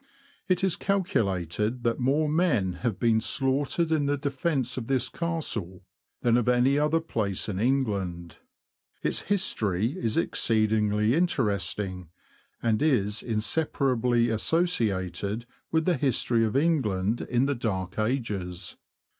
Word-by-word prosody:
It 185 0 +1
is 190 -3 +2
calculated 110 - -1
that 115 +2 0
more 140 +5 +2
men 150 - +1
have 120 -6 -1
been 115 -2 +3
slaughtered 145 +6 0
in 150 -3 +2
the 145 0 +1
defence 140 -2 -1
of 120 -3 -5
this 135 -2 +1
Castle 115 - -3 0.4
than 120 -1 +4
of 125 0 +1
any 125 +3 +3
other 150 +2 +2
place 105 - -2
in 100 -3 -3
England. 100 -9 -1 0.6
Its - - +1
history 110 - 0
is 110 -7 -1
exceedingly 110 0 +2
interesting, 100 - -1 0.5
and 115 +1 +1
is 110 -9 +1
inseparably 120 0 +1
associated 110 - 0 0.3
with 160 0 +1
the 180 -4 +2
history 120 -3 +1
of 110 - -2
England 120 - +1
in 120 +2 +1
the 140 - +1
Dark 100 -5 -3
Ages. 100 -7 -2
120 Hz, 125 wpm, -27 LUFS, 105-145 Hz, 0.6 s, than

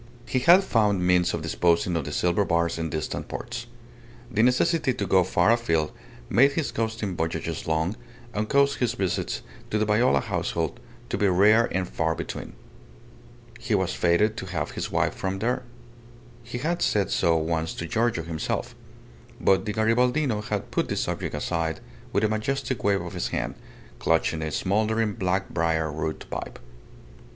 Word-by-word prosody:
He 130 - 0
had 175 +8 +7
found 105 - +2
means 90 -1 +3
of 80 - -3
disposing 85 +2 +2
of 80 -4 -1
the - - -5
silver 90 +3 +2
bars 85 -2 0
in 80 0 -2
distant 80 -1 -3
ports. - - -6 0.6
The 110 - +2
necessity 130 +3 +3
to - - -2
go 95 -1 +4
far 95 - +3
afield 85 -10 +1 0.4
made 140 +4 +4
his 155 -1 -1
coasting 110 -4 -2
voyages 80 -1 -3
long, 80 +5 0 0.4
and 105 0 -2
caused 140 0 +3
his 120 -2 +1
visits 95 -7 -2 0.3
to 110 - 0
the 110 - +1
Viola 110 +4 +3
household 85 - -2 0.3
to - - -2
be 105 - +3
rare 105 +5 +5
and 95 -1 -1
far 80 -1 -1
between. - - -6 1.1
He - - 0
was - - 0
fated 105 +6 +2
to 95 - -5
have 80 -5 -3
his - - -4
wife - - +1
from 95 0 -3
there. 115 +5 0 0.8
He 115 +1 -6
had 165 +7 -1
said 100 -2 +1
so 85 -1 +3
once 80 0 -1
to 85 - -4
Giorgio 110 -1 0
himself. 80 -2 -3 0.7
But 95 -1 +3
the 105 - -2
Garibaldino 120 +2 +2
had - - -3
put - - 0
the - - -1
subject - - -2
aside 80 -2 -2 0.3
with 100 - +1
a - - +5
majestic 115 +3 -2
wave 100 -1 +2
of - - -7
his - - -2
hand, - - -2 0.5
clutching 80 -1 +1
a 80 - -2
smouldering 110 +6 0
black 95 +1 -1
briar 80 -2 0
root 80 +1 -4
pipe. - - -5
100 Hz, 170 wpm, -26 LUFS, 85-115 Hz, 1.1 s, had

